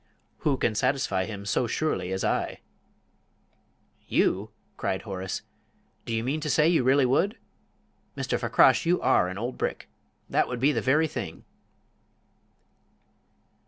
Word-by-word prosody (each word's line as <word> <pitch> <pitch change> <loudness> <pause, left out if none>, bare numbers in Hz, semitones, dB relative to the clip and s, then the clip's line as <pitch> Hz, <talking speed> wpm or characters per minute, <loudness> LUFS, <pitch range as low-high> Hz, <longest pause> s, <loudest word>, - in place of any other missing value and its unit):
"Who 140 -3 +1
can 115 - +1
satisfy 105 -5 0
him 100 -1 -7
so 115 +4 0
surely 115 -9 -1
as 95 0 -2
I?" - - -1 1.5
"You!" 100 +3 +1 0.3
cried 95 - -2
Horace. 95 -3 -5 0.6
"Do 115 - -1
you 110 - -1
mean 140 +5 -1
to 150 - -3
say 150 +3 +4
you 165 -6 +3
really 135 +2 +4
would? 195 - +1 0.8
Mr. - - -1
Fakrash, - - +4
you 175 +1 +2
are 90 - +3
an 95 +1 -5
old 120 +4 -4
brick! - - -3 0.4
That - - +1
would 125 -1 -4
be 140 +4 +4
the - - -1
very 145 +5 +3
thing!" 85 - -6
125 Hz, 140 wpm, -27 LUFS, 100-145 Hz, 1.5 s, say